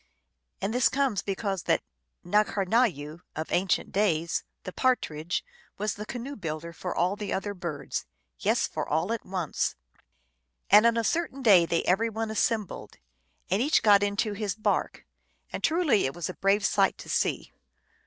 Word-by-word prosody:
And 200 +3 -1
this 250 0 +4
comes 265 -7 0
because 195 -1 -2
that - - +2 0.4
N^karnayoo, 190 - +1 0.2
of 155 +1 -4
ancient 185 +1 +1
days, 170 -5 +1 0.2
the 185 - -7
Partridge, 175 - 0 0.3
was 210 0 -1
the 210 +1 -8
canoe 265 +3 -5
builder 165 -2 -5
for 180 +2 -5
all 180 +3 +1
the 205 -1 -5
other 205 +2 -2
birds. 160 -7 -5 0.3
Yes, - - +2
for - - -4
all 160 +8 +1
at 230 - -4
once. 185 -5 -2 1.0
And 210 +3 +8
on 235 0 +2
a 230 - +1
certain 275 0 -1
day 185 -8 +6
they 170 - +1
every 220 +6 +2
one 220 0 -3
assembled, 220 -2 -2 0.5
and 195 +4 +2
each 295 +5 +3
got 205 -2 +6
into 205 +1 0
his 200 -2 -3
bark, 215 - -1 0.5
and - - -5
truly 315 - +3
it 135 - -6
was 175 -2 -3
a 185 - -5
brave 195 +1 +2
sight - - +2
to - - -11
see. - - -1
200 Hz, 165 wpm, -27 LUFS, 175-225 Hz, 1.0 s, And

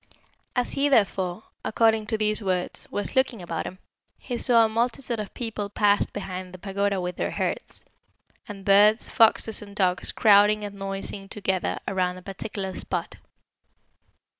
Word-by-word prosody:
"As 250 -1 +2
he, 285 +1 +2
therefore, 195 -5 +1 0.2
according 220 -1 +2
to 220 - 0
these 215 0 +1
words, 185 -3 -2
was 205 - -3
looking 260 -4 +2
about 170 -2 -4
him, 185 - -8 0.4
he 245 - -5
saw 235 -1 +4
a - - +2
multitude 235 +1 -1
of 210 - -5
people 220 -4 -4
pass 205 0 +2
behind 185 -2 -6
the - - -8
pagoda 200 +1 -1
with 180 -1 -4
their - - -1
herds; - - -3 0.6
and 200 -3 -9
birds, 210 +3 +5
foxes, 225 -1 +4
and 200 -1 -11
dogs 180 -3 +1
crowding 210 0 +5
and 205 -1 -5
noising 195 0 -5
together 190 -3 -1
around 185 -1 0
a 180 - -12
particular 195 0 -5
spot. - - -4
205 Hz, 155 wpm, -25 LUFS, 190-220 Hz, 0.6 s, birds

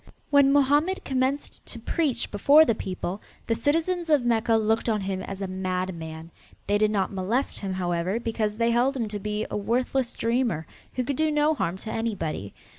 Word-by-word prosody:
When 280 -1 +6
Mohammed 290 +6 +3
commenced 265 +2 -1
to - - -6
preach 310 -7 -1
before 285 +10 +6
the 230 - +2
people, 190 -1 -4 0.2
the 230 - +1
citizens 330 +7 0
of 290 -5 +3
Mecca 230 -1 +2
looked 220 +1 +1
on 215 -2 +1
him 190 -1 -3
as 195 +1 -5
a - - -2
madman. 180 -3 -4 0.3
They 205 0 +1
did 215 0 +3
not 200 -2 0
molest 205 +8 -1
him, 195 -2 -3
however, 180 +3 -1
because 220 -2 -2
they 230 0 +2
held 255 +4 +2
him 230 -3 -1
to 205 0 -4
be 210 +1 -2
a - - -2
worthless 245 +4 0
dreamer 230 -9 0 0.3
who 255 - 0
could 265 +2 -2
do 315 0 +2
no 300 +1 +3
harm 185 - -2
to 220 +3 -7
anybody. 170 - -3
225 Hz, 190 wpm, -26 LUFS, 190-270 Hz, 0.3 s, When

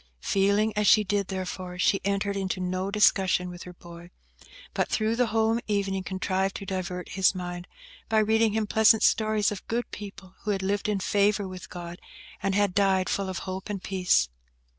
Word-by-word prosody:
Feeling 200 +2 +2
as 210 0 +1
she 215 +2 +6
did, 200 -1 -1
therefore, 185 -1 -5
she 195 +2 +2
entered 200 0 -1
into 190 -1 -2
no 185 +1 -2
discussion 190 -3 +3
with 175 0 -10
her 180 - -9
boy, 170 0 -13 0.6
but - - 0
through 220 +1 0
the 245 0 +2
home 225 +1 +1
evening 195 -2 -1
contrived 190 0 -2
to 200 - -6
divert 180 -2 -4
his 190 0 +2
mind, 175 -1 -6 0.4
by 220 - +2
reading 220 0 +3
him 220 0 0
pleasant 220 +1 +4
stories 215 -2 +2
of 205 - -7
good 240 +1 -2
people 195 -2 -9
who 215 - -5
had 195 -2 0
lived 205 +2 -1
in 205 -2 0
favour 205 +1 +1
with 185 0 -9
God, 175 0 -8 0.4
and 195 -1 0
had 205 -2 +2
died 195 -1 +2
full 195 -1 -1
of 185 - -4
hope 190 +1 -5
and 200 -3 -4
peace. 185 - +2
195 Hz, 185 wpm, -27 LUFS, 185-210 Hz, 0.6 s, she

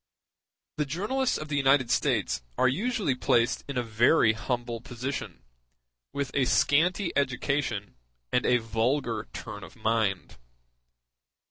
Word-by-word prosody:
The 150 - 0
journalists 215 - 0
of 155 - -6
the 145 -1 -2
United 135 -2 +3
States - - +1 0.2
are - - +4
usually 200 - 0
placed 120 -1 +1
in 140 -2 -4
a 125 - +1
very 115 +2 +4
humble 120 0 -3
position, 125 +4 -5 0.7
with 140 -1 -3
a 135 -2 +2
scanty 175 +9 +2
education 130 -6 -1 0.4
and 125 - +2
a 125 - +4
vulgar 115 0 -1
turn 105 -1 -7
of - - -12
mind. 110 - -1
130 Hz, 125 wpm, -28 LUFS, 115-145 Hz, 0.7 s, are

